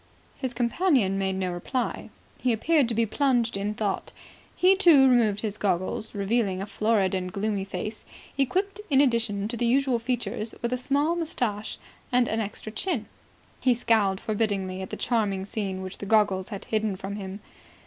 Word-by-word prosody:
His 255 -3 -4
companion 240 - +2
made 190 -1 0
no 185 -1 -1
reply. 240 +8 -3 0.3
He 255 - +1
appeared 290 +4 +3
to 230 - -1
be 230 +1 +3
plunged 240 -1 +1
in 205 +2 -2
thought. 205 -3 -2 0.4
He, 370 +2 +5
too, 335 -9 +7
removed 225 -5 +3
his 215 -1 -3
goggles, 195 +3 -1
revealing 200 -1 0
a 195 - -3
florid 210 -2 +1
and 185 -1 -2
gloomy 200 0 -1
face, 200 +3 -5 0.3
equipped, 375 +10 0
in 270 -2 +4
addition 230 -7 +2
to 240 - -3
the 235 0 0
usual 260 0 +2
features, 235 -2 -3
with 235 +1 0
a - - +1
small 285 +6 +1
moustache 245 - -2 0.3
and 250 -1 +3
an 220 - -1
extra 215 0 -5
chin. 240 - -2 0.5
He 255 -2 +3
scowled 215 -5 +2
forbiddingly 200 -4 -1
at 190 - -6
the - - -5
charming 205 -5 0
scene 195 -2 -3
which 185 0 -7
the 200 - -6
goggles 205 -3 +2
had 200 -3 -6
hidden 215 -2 0
from 195 +2 -6
him. 195 0 -6
220 Hz, 175 wpm, -26 LUFS, 195-250 Hz, 0.5 s, too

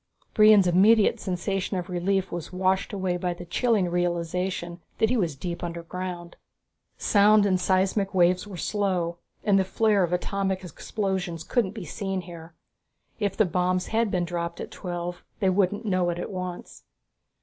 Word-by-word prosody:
Brion's 215 -2 +7
immediate 200 +5 +4
sensation 190 +1 -2
of 180 -1 -4
relief 190 +1 -1
was 170 -2 -5
washed 185 +1 0
away 190 -3 -1
by 180 -1 -2
the 175 - -9
chilling 215 0 +1
realization 175 0 -2 0.2
that 220 - +2
he - - +2
was 175 - 0
deep 170 +5 -5
underground. 175 +1 -6 0.6
Sound 210 0 +5
and 185 -2 +2
seismic 190 +2 +1
waves 180 +1 +3
were 195 -3 -8
slow, 180 -2 -1 0.2
and 200 -2 +4
the - - +3
flare 205 +2 +2
of 175 -2 +1
atomic 190 +1 -1
explosions 185 -1 -3
couldn't 220 -5 0
be 205 -5 -6
seen 195 +2 -3
here. 170 -2 -11 0.6
If 200 -3 -1
the 215 - +4
bombs 180 +1 0
had 225 0 +1
been 180 -2 0
dropped 170 0 -4
at - - -6
twelve 175 -1 -5 0.2
they 190 -2 +2
wouldn't 205 +3 +1
know 185 -3 +1
it 170 - -2
at 175 - -5
once. 180 -2 -6
185 Hz, 160 wpm, -26 LUFS, 175-200 Hz, 0.6 s, Brion's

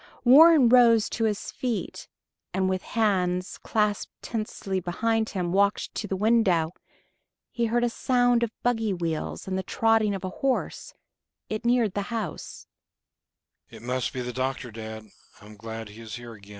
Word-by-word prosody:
Warren 295 +2 +8
rose 230 -3 +5
to 225 - -1
his 210 -2 -2
feet, 245 -4 -4 0.5
and 190 0 +1
with 185 0 -1
hands 185 -5 0
clasped 210 -1 -1
tensely 215 -4 -3
behind 220 +5 -1
him 180 -3 -2
walked 200 +2 +1
to 210 - -4
the 195 - -2
window. 195 -6 +2 0.8
He 235 - -1
heard 240 +2 +1
a 240 - +2
sound 245 -1 +2
of 235 - +1
buggy 225 -4 +1
wheels 170 -1 -4
and 190 0 -1
the - - -1
trotting 220 +1 +1
of 195 - -7
a 185 - -2
horse; 275 - -2 0.5
it 215 +2 -4
neared 235 -4 +2
the 205 - -1
house. 220 -8 -5 1.0
"It - - -13
must 125 +1 -2
be 130 - -4
the 125 0 -5
doctor, 130 -1 -3
dad. 110 0 -8
210 Hz, 140 wpm, -26 LUFS, 180-235 Hz, 1.0 s, Warren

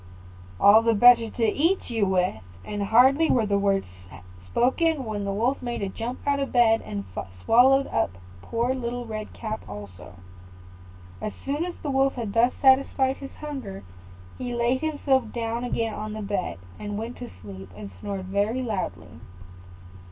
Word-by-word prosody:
"All 210 +2 +7
the 230 0 +2
better 235 +1 +7
to 230 - -1
eat 305 - +1
you 220 -4 +1
with;" 185 - 0 0.2
and 205 -1 -4
hardly 260 +9 +5
were 235 -4 +3
the 200 -1 +1
words 195 -1 +1 0.6
spoken 265 - +1
when 210 -2 -3
the 200 - -1
Wolf 235 +7 0
made 240 -4 -3
a 195 - -2
jump 235 +5 -5
out 285 0 +1
of 275 - -2
bed, 225 -2 +4
and 100 -1 -6 0.4
swallowed 265 +4 +5
up - - 0 0.3
poor 235 - -1
Little 245 -1 -4
Red 215 -1 -6
Cap 220 -1 -5
also. 100 -4 -10 1.1
As 215 - -3
soon 285 +4 -1
as 360 - -5
the 290 - -2
Wolf 270 0 +2
had 225 -5 -4
thus 235 +2 +4
satisfied 265 0 +4
his 275 - -10
hunger, 270 - -6 0.6
he 245 -1 -3
laid 240 +2 +1
himself 275 -6 0
down 230 0 -3
again 230 -2 -1
on 215 0 -5
the 215 -1 -5
bed, 195 - -2 0.2
and 205 0 -4
went 230 +3 -5
to 245 -1 -7
sleep 95 -2 -9
and 100 -2 -8
snored 195 - -5
very 205 +6 0
loudly. 210 -6 -4
230 Hz, 165 wpm, -25 LUFS, 205-260 Hz, 1.1 s, All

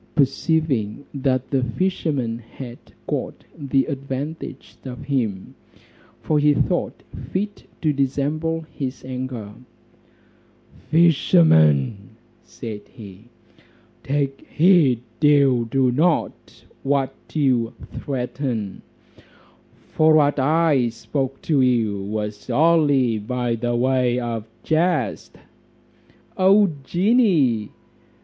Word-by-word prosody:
Perceiving 140 -4 0
that 130 -2 -1
the 135 -2 +2
fisherman 130 -5 -1
had 120 +1 -10 0.3
got - - -4
the 135 -2 0
advantage 140 +2 -6
of 125 -2 -7
him, 115 -9 -2 0.7
for 150 -1 +1
he 150 0 +4
thought - - -1 0.3
fit 205 +2 -3 0.2
to 155 -2 +2
dissemble 145 +4 -1
his 140 -5 -6
anger; 125 -5 -5 1.4
"Fishermen," 110 - +3 0.3
said 110 -4 -8
he, 105 -4 -13 0.8
"take 140 -1 -2
heed 155 - +4 0.2
you 140 -5 +4
do 130 +1 +2
not 160 +6 -1 0.2
what 135 -1 0 0.2
you 125 -6 +1 0.2
threaten; 125 -5 -4 1.1
for 155 0 +4
what 145 -2 +3
I 145 -3 +2
spoke 135 +4 -4
to 150 -4 +2
you 115 -6 +1
was 105 0 -5
only 145 -8 +3
by 120 +2 -2
way 120 +1 +1
of 115 -3 -4 0.2
jest." 160 - 0 1.0
"O 195 0 +5
genie!" 170 - +2
135 Hz, 90 wpm, -22 LUFS, 120-155 Hz, 1.4 s, O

